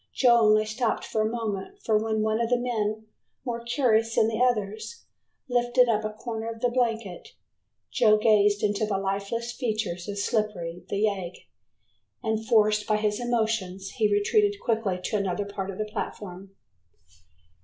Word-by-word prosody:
Joe 240 -2 +5
only 215 0 +4
stopped 220 +2 -1
for 220 - -1
a 215 - +1
moment, 225 - -4
for 220 - +2
when 220 0 +1
one 220 +1 +1
of 230 - 0
the 245 - +3
men, 220 -3 -2 0.4
more 235 -2 -3
curious 230 -2 +1
than 220 - +4
the 220 0 -3
others, 220 - -1 0.4
lifted 245 0 +3
up 215 -2 +1
a 215 - -2
corner 225 +1 -5
of 225 0 -7
the 245 - +1
blanket, 225 -7 -2 0.6
Joe 215 -3 +4
gazed 210 -1 +3
into 210 +1 +1
the 200 -2 0
lifeless 200 +5 -2
features 215 -8 -3
of 205 - -4
Slippery, 200 -6 -2
the 200 +1 -1
yegg, 190 -4 -2 0.8
and 220 0 -1
forced 215 -2 +3
by 215 - +2
his 210 0 0
emotions 220 -6 -1
he 215 -5 +1
retreated 405 - +2
quickly 220 -6 -1
to 210 - -1
another 200 0 -1
part 200 -1 -5
of 190 - -6
the 215 - -2
platform. 195 -2 -7
215 Hz, 165 wpm, -26 LUFS, 205-230 Hz, 0.8 s, Joe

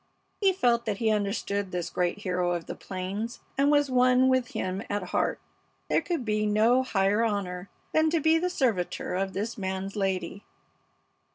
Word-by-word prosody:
He 395 -2 +4
felt 240 -9 +2
that 210 -3 -1
he 220 0 +1
understood 200 -1 -1
this 180 -2 -3
great 180 +3 -1
hero 180 -2 0
of 170 -1 -3
the - - -5
plains 195 +5 -5 0.2
and 275 +1 +3
was 290 -2 +3
one 255 +1 +4
with 260 -1 +2
him 185 -1 -3
at 205 -1 -1
heart. 180 - -1 0.5
There - - +3
could 335 -9 -3
be 215 -1 +1
no 225 +5 +4
higher 205 -3 +1
honor 195 -4 -2 0.2
than 315 0 +3
to 330 +1 +1
be 320 +2 +4
the 360 +2 0
servitor 230 - -1
of 190 +1 -1
this 215 +3 -3
man's 190 +1 -3
lady. 190 -1 -2
210 Hz, 175 wpm, -27 LUFS, 190-255 Hz, 0.5 s, He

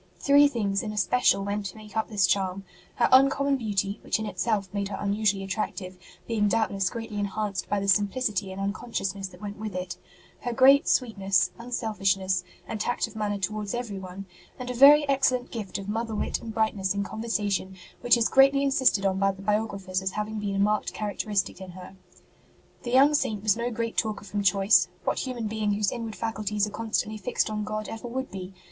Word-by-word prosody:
Three 285 +1 +6
things 205 -7 -1
in 215 - -4
especial 210 0 +2
went 200 0 -2
to 190 - -10
make 215 0 -13
up 220 - -1
this 205 -4 +3
charm: 190 0 0 0.3
her 240 - +3
uncommon 275 +1 +5
beauty, 205 -4 -2
which - - 0
in 220 - -4
itself 205 +1 -1
made 200 -1 -1
her 195 - -5
unusually 200 -1 0
attractive, 195 -2 -4 0.3
being 215 -3 +1
doubtless 200 -3 +1
greatly 225 -3 -5
enhanced 205 -1 -3
by 205 - +1
the 200 - -3
simplicity 200 0 +1
and 190 - -7
un 200 +1 -1
consciousness 195 -4 -4
that 180 0 -15
went 205 0 -6
with 215 -3 -5
it; 180 -1 -4 0.4
her 245 - -3
great 270 +3 +6
sweet 230 -5 +1
ness, 195 -1 +2
unselfishness, 195 -6 -1 0.2
and 215 -1 -4
tact 245 - 0
of 225 -2 -12
manner 210 -1 -1
towards 205 +2 -3
everyone; 195 -5 -6 0.3
and 250 -1 -5
a - - -3
very 285 +4 +7
excellent 260 -2 +1
gift 210 -4 -5
of 200 -1 -7
mother 225 +1 -2
wit - - -2
and 225 -2 -7
brightness 205 -3 0
in 200 - 0
conversation 205 -4 -2 0.2
which 245 0 +4
is 235 - +2
greatly 275 +1 +5
insisted 260 -7 +2
on 190 0 +1
by 195 0 +3
the 195 0 -12
biographers 200 -3 -1
as 190 -1 -2
having 210 +1 -3
been 200 -1 -2
a - - -1
marked 210 +1 +1
characteristic 205 -2 -2
in 185 -1 -9
her. 185 +1 -11 0.9
The 240 - -6
young 275 +4 +6
Saint 215 -8 0
was 215 -2 +3
no 235 +1 -2
great 230 -1 -4
talker 215 -2 -1
from 205 0 -3
choice 195 -1 +4 0.2
what - - 0
human 245 -3 -4
being 215 -1 -1
whose 205 -1 0
inward 225 -3 -5
faculties 215 -2 -1
are 210 - -7
constantly 215 -1 -2
fixed 220 0 -1
on 210 0 -2
God 215 0 -4
ever 225 +2 -7
would 260 +2 -4
be 190 0 -8
210 Hz, 200 wpm, -26 LUFS, 195-230 Hz, 0.9 s, very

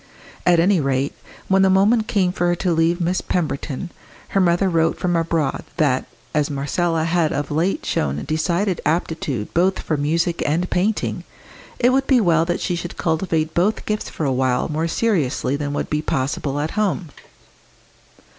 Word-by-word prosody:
At 175 -1 +5
any 185 +2 +4
rate, 135 0 0 0.3
when 190 0 +3
the 190 - +5
moment 210 +4 +3
came 195 -6 +1
for 175 -1 0
her 175 - +2
to 175 0 0
leave 165 +2 +2
Miss 180 +2 0
Pemberton, 160 0 -3 0.4
her 195 - +2
mother 175 +2 +3
wrote 165 -2 +1
from 175 -1 0
abroad 165 -4 0
that, 140 -6 +2 0.3
as 150 -1 +1
Marcella 160 +4 0
had 165 -1 +1
of 145 0 -3
late 165 +6 0
shown 70 0 -1
decided 175 +4 0
aptitude 155 -8 -2
both 185 +3 +2
for 155 - -2
music 165 +4 0
and 165 +5 0
painting, 205 +4 0 0.5
it 245 +1 +3
would 270 +1 +1
be 260 -3 +5
well 165 -6 +3
that 175 0 -2
she 175 - -1
should 175 0 -6
cultivate 160 -1 0
both 190 +6 +1
gifts 215 0 -2
for 155 - -4
a 135 - +1
while 130 -1 +1
more 160 +2 -1
seriously 160 - 0
than 145 0 -3
would - - -2
be 150 0 +1
possible 140 0 -2
at 150 +2 -2
home. 200 -5 -1
165 Hz, 175 wpm, -21 LUFS, 150-185 Hz, 0.5 s, At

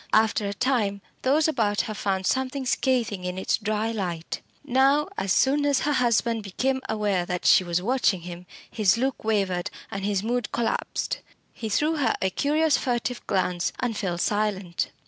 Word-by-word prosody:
After 215 -1 +3
a 200 - -2
time 215 -4 +1 0.2
those 295 +5 +3
about 215 -9 +1
her 215 - -5
found 195 -2 -1
something 265 +3 0
scathing 245 -7 0
in 180 0 -3
its 190 - +1
dry 215 +1 -1
light. 175 -6 -4 0.2
Now, 275 +2 +3
as 195 - -2
soon 280 +8 +3
as 285 -2 +2
her 295 - +1
husband 235 -3 +2
became 260 +7 -1
aware 205 -4 +1
that 180 -1 -3
she - - +6
was 175 0 -1
watching 235 -5 +2
him, 175 +1 -9 0.2
his 210 -1 +3
look 265 +2 -1
wavered, 195 -5 0 0.2
and 195 0 -4
his 200 -1 0
mood 245 +2 -1
collapsed. 235 -1 -1 0.3
He 220 - -5
threw 305 +9 +1
her 285 - +2
a 190 - 0
curious 295 - +2
furtive 245 -1 -2
glance, 180 -2 0
and 245 -3 -1
fell 185 -5 -2
silent. 200 -2 -1
215 Hz, 170 wpm, -25 LUFS, 190-260 Hz, 0.3 s, she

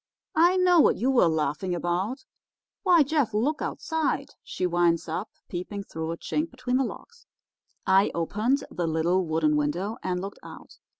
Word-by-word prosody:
I 345 +3 +4
know 360 -2 +5
what - - +5
you 255 +4 +1
were 245 -9 +5
laughing 160 +3 -1
about. 185 +10 -2 0.6
Why, 355 -5 +5
Jeff, 280 -7 0
look 280 +8 0
outside,' 320 -1 -2
she 185 - -4
winds 170 -1 +2
up, 175 +7 -3 0.2
peeping 195 +3 -5
through 160 -3 -5
a 165 - -4
chink 310 - -2
between 250 -1 -2
the 270 - +2
logs. 470 - -9 0.6
I 190 +1 +4
opened 215 - 0
the 175 -2 -2
little 165 +4 +1
wooden 155 -1 +2
window 175 +10 -1
and 180 -1 -2
looked 195 +2 -7
out. - - -13
195 Hz, 165 wpm, -26 LUFS, 170-270 Hz, 0.6 s, know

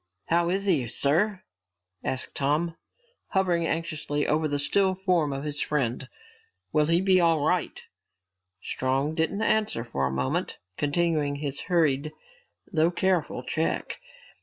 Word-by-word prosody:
"How 170 +1 +3
is 195 +2 0
he, 155 -11 +2
sir?" 180 - +1 0.6
asked 130 0 -3
Tom, 155 +4 0 0.5
hovering 175 -4 +1
anxiously 155 -3 -2
over 155 +1 +1
the 145 -1 -1
still 190 +6 +2
form 180 -6 +1
of 135 0 -4
his 145 -1 -4
friend. 130 -3 -1 0.6
"Will 150 -1 +3
he 165 +2 +3
be 190 -1 +4
all 165 -3 +3
right?" 180 +1 0 0.8
Strong 135 +4 -1
didn't 165 +6 0
answer 215 - +1
for 70 - -1
a - - -3
moment, 65 0 -2 0.2
continuing 150 -1 0
his 140 -1 -3
hurried, 155 -4 +2 0.6
though 160 0 +4
careful 175 -7 0
check. 160 +5 -2
155 Hz, 135 wpm, -27 LUFS, 140-175 Hz, 0.8 s, be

